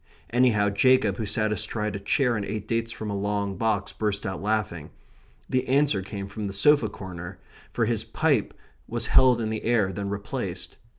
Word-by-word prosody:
Anyhow, 115 Hz, -4 st, +3 dB
Jacob, 105 Hz, -2 st, +3 dB
who 110 Hz, -, -3 dB
sat 110 Hz, +1 st, 0 dB
astride 105 Hz, 0 st, -1 dB
a -, -, -3 dB
chair 125 Hz, +4 st, +1 dB
and 105 Hz, -, -2 dB
ate 105 Hz, +1 st, -4 dB
dates 115 Hz, 0 st, -1 dB
from 110 Hz, -2 st, -5 dB
a -, -, -2 dB
long 100 Hz, 0 st, -1 dB
box, 105 Hz, 0 st, 0 dB
burst 105 Hz, -1 st, -2 dB
out 95 Hz, -2 st, -3 dB
laughing. 100 Hz, -7 st, -1 dB, 0.6 s
The 130 Hz, 0 st, 0 dB
answer 135 Hz, -6 st, +3 dB
came 100 Hz, +1 st, -6 dB
from 105 Hz, +2 st, -6 dB
the 100 Hz, -, -4 dB
sofa 115 Hz, +3 st, +4 dB
corner; 90 Hz, -1 st, -8 dB, 0.3 s
for 115 Hz, -, +1 dB
his 110 Hz, -1 st, 0 dB
pipe 130 Hz, +1 st, 0 dB, 0.3 s
was -, -, -2 dB
held 130 Hz, -2 st, +5 dB
in 110 Hz, -1 st, -2 dB
the 110 Hz, -, -3 dB
air, 110 Hz, -5 st, +2 dB
then 100 Hz, -1 st, -3 dB
replaced. 100 Hz, 0 st, -4 dB
105 Hz, 185 wpm, -26 LUFS, 100-115 Hz, 0.6 s, held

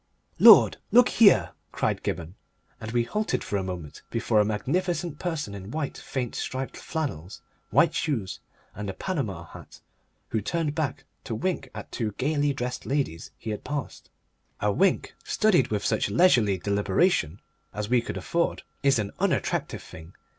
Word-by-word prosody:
"Lord, -, -, +9 dB
look 245 Hz, +1 st, +6 dB
here!" 105 Hz, -, +5 dB, 0.2 s
cried -, -, -1 dB
Gibberne, 85 Hz, +1 st, -4 dB, 0.5 s
and 110 Hz, -, -6 dB
we 120 Hz, 0 st, +2 dB
halted 210 Hz, -, -1 dB
for 100 Hz, -, -2 dB
a 95 Hz, -, -2 dB
moment 90 Hz, -5 st, -6 dB
before 115 Hz, -1 st, +1 dB
a -, -, +6 dB
magnificent 165 Hz, -, -1 dB
person 160 Hz, -, -3 dB
in 100 Hz, 0 st, -8 dB
white 150 Hz, +2 st, -3 dB
faint 125 Hz, -4 st, -4 dB
striped 130 Hz, 0 st, -4 dB
flannels, 105 Hz, -, -5 dB, 0.3 s
white -, -, +4 dB
shoes, 115 Hz, -11 st, -2 dB, 0.3 s
and 105 Hz, 0 st, -5 dB
a 95 Hz, -, -5 dB
Panama 115 Hz, -, -3 dB
hat, -, -, -13 dB, 0.5 s
who 110 Hz, -, -1 dB
turned 160 Hz, -, -1 dB
back 150 Hz, -4 st, -2 dB, 0.2 s
to 115 Hz, -, -3 dB
wink 165 Hz, 0 st, -2 dB
at -, -, -8 dB
two 110 Hz, -4 st, -2 dB
gaily 145 Hz, +4 st, +1 dB
dressed 125 Hz, -2 st, -4 dB
ladies 135 Hz, -, -2 dB
he 110 Hz, -, -5 dB
had 105 Hz, -, -5 dB
passed. 145 Hz, -4 st, -5 dB, 0.5 s
A 105 Hz, -, +1 dB
wink, 190 Hz, -, +1 dB
studied 190 Hz, -, +3 dB
with 105 Hz, -4 st, -2 dB
such -, -, +1 dB
leisurely 110 Hz, -, +4 dB
deliberation 100 Hz, -, +1 dB, 0.3 s
as 105 Hz, 0 st, -4 dB
we 120 Hz, +1 st, +3 dB
could -, -, -5 dB
afford, 170 Hz, 0 st, -1 dB, 0.2 s
is 140 Hz, -2 st, +4 dB
an 105 Hz, -2 st, -2 dB
unattractive -, -, -1 dB
thing. 80 Hz, +3 st, -12 dB
120 Hz, 160 wpm, -26 LUFS, 100-155 Hz, 0.5 s, Lord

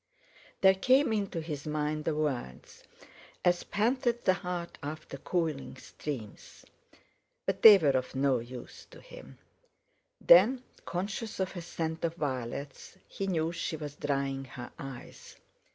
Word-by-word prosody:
There 190 Hz, 0 st, +7 dB
came 255 Hz, +6 st, +3 dB
into 200 Hz, -5 st, -2 dB
his 155 Hz, -2 st, -6 dB
mind 150 Hz, 0 st, -2 dB
the 160 Hz, -, 0 dB
words: 130 Hz, -, -4 dB, 0.6 s
"As 175 Hz, 0 st, +3 dB
panteth 240 Hz, +2 st, 0 dB
the 185 Hz, -, +4 dB
hart 180 Hz, -2 st, -5 dB
after 150 Hz, -1 st, -6 dB
cooling 160 Hz, -2 st, -2 dB
streams"—but 150 Hz, -, -8 dB
they 215 Hz, -3 st, +11 dB
were 155 Hz, -6 st, +2 dB
of 130 Hz, 0 st, -2 dB
no 135 Hz, -2 st, +2 dB
use 120 Hz, +1 st, -10 dB
to -, -, -14 dB
him. -, -, -13 dB, 0.8 s
Then, 230 Hz, +9 st, +6 dB, 0.2 s
conscious 200 Hz, +5 st, -4 dB
of 190 Hz, 0 st, -2 dB
a 175 Hz, -, -4 dB
scent 165 Hz, -1 st, -4 dB
of 165 Hz, 0 st, -1 dB
violets, 140 Hz, +1 st, -5 dB
he 195 Hz, -, -4 dB
knew 165 Hz, -3 st, 0 dB
she 170 Hz, -1 st, -3 dB
was 145 Hz, -2 st, -6 dB
drying 135 Hz, -2 st, -2 dB
her 125 Hz, -2 st, -9 dB
eyes. 135 Hz, -3 st, -9 dB
160 Hz, 135 wpm, -30 LUFS, 140-190 Hz, 0.8 s, they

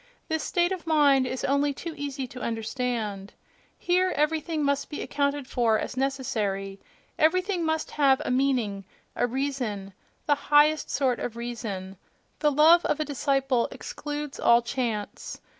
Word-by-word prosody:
—this 320 Hz, -1 st, 0 dB
state 350 Hz, +2 st, +1 dB
of 365 Hz, -3 st, -5 dB
mind 285 Hz, -4 st, +4 dB
is 260 Hz, -, -4 dB
only 280 Hz, +1 st, +1 dB
too 335 Hz, +2 st, -6 dB
easy 280 Hz, -2 st, -4 dB
to 250 Hz, 0 st, -10 dB
understand. 225 Hz, -4 st, -3 dB, 0.4 s
Here 365 Hz, +1 st, +2 dB
everything 310 Hz, +1 st, 0 dB
must 280 Hz, 0 st, 0 dB
be 295 Hz, -, -5 dB
accounted 285 Hz, -1 st, -1 dB
for 235 Hz, -4 st, +2 dB
as 250 Hz, -, -4 dB
necessary; 210 Hz, -8 st, -2 dB, 0.4 s
everything 365 Hz, +3 st, +2 dB
must 320 Hz, 0 st, -1 dB
have 275 Hz, -3 st, +3 dB
a -, -, -1 dB
meaning, 250 Hz, -7 st, +1 dB, 0.3 s
a 245 Hz, -, +1 dB
reason, 245 Hz, -7 st, -3 dB, 0.3 s
the 295 Hz, -, +4 dB, 0.2 s
highest 300 Hz, +1 st, +4 dB
sort 260 Hz, -4 st, +1 dB
of 230 Hz, -, -4 dB
reason; 215 Hz, -6 st, -5 dB, 0.4 s
the 300 Hz, -1 st, +3 dB
love 320 Hz, +4 st, +6 dB
of 295 Hz, -, 0 dB
a 310 Hz, -, 0 dB
disciple 270 Hz, -3 st, +1 dB
excludes 295 Hz, -1 st, -6 dB
all 235 Hz, 0 st, +5 dB
chance. 235 Hz, -4 st, -4 dB
270 Hz, 145 wpm, -26 LUFS, 235-300 Hz, 0.4 s, love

